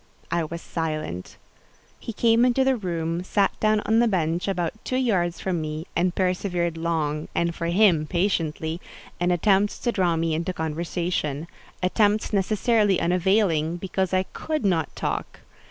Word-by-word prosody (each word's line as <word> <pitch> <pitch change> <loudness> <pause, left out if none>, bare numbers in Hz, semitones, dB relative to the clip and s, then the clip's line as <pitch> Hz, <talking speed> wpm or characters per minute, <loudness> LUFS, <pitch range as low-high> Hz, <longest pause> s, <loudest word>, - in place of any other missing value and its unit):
I 170 - +1
was 170 +2 -7
silent. 155 - -4 0.6
He - - -6
came 230 +2 +3
into 250 +1 +3
the 265 0 +3
room, 170 -4 -2
sat 200 +1 +2
down 215 0 +3
on 220 +1 +3
the 240 - +4
bench 170 -3 0
about 185 +2 -2
two 255 - -2
yards 180 -9 +1
from 180 -4 -1
me, 155 +1 -4
and 175 +1 +1
persevered 180 -2 0
long, 160 -2 -1
and, 170 0 +1
for 170 0 -3
him, 170 -4 +4
patiently, 165 -2 -1 0.4
in 175 +1 +1
attempts 195 +3 +2
to 240 - -1
draw 180 -6 +1
me 165 0 0
into 170 +4 -2
conversation—attempts 170 +5 -1
necessarily 205 0 +2
unavailing, 175 -2 +2
because 190 +1 -2
I 185 0 +2
could 310 -6 -2
not 175 -5 +1
talk. - - -4
175 Hz, 150 wpm, -24 LUFS, 165-205 Hz, 0.6 s, the